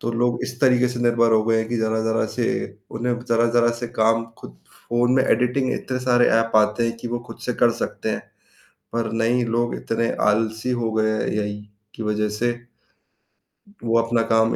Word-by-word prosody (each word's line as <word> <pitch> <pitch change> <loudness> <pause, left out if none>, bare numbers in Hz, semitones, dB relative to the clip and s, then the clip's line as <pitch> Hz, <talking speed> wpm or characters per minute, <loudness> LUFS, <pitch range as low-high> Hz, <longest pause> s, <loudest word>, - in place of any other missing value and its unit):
तो 115 - -2
लोग 120 +1 +1
इस 125 +1 -8
तरीके 125 -2 +4
से 125 -1 -5
निर्भर 115 -1 +3
हो 110 -1 +4
गए 115 0 +2
हैं 110 0 -2
कि 120 - -1
ज़रा-ज़रा 110 0 0
से 120 -1 0 0.4
उन्हें 120 +1 -2
ज़रा-ज़रा 120 0 +3
से 120 - -3
काम 115 +1 +3
खुद - - -12 0.3
फ़ोन 120 +1 +2
में 130 - +4
एडिटिंग 125 +2 +1
इतने 130 -1 -3
सारे 120 -1 +4
ऐप 115 0 -2
आते 105 +2 +3
हैं 115 0 -3
कि 120 - -5
वो 120 +1 -2
खुद - - -10
से 125 - 0
कर 120 - +6
सकते - - -3
हैं, - - -2 0.7
पर 115 -1 -1
नहीं 115 +2 +1
लोग 120 +1 -1
इतने 115 0 -1 0.2
आलसी 110 +3 -1
हो 115 - 0
गए 110 0 +1 0.2
एआई 105 -1 -2 0.3
की - - -6
वजह 105 0 0
से। 120 0 +2 1.3
वो 115 0 +2
अपना 115 0 0
काम 115 0 +3
115 Hz, 190 wpm, -22 LUFS, 110-120 Hz, 1.3 s, कर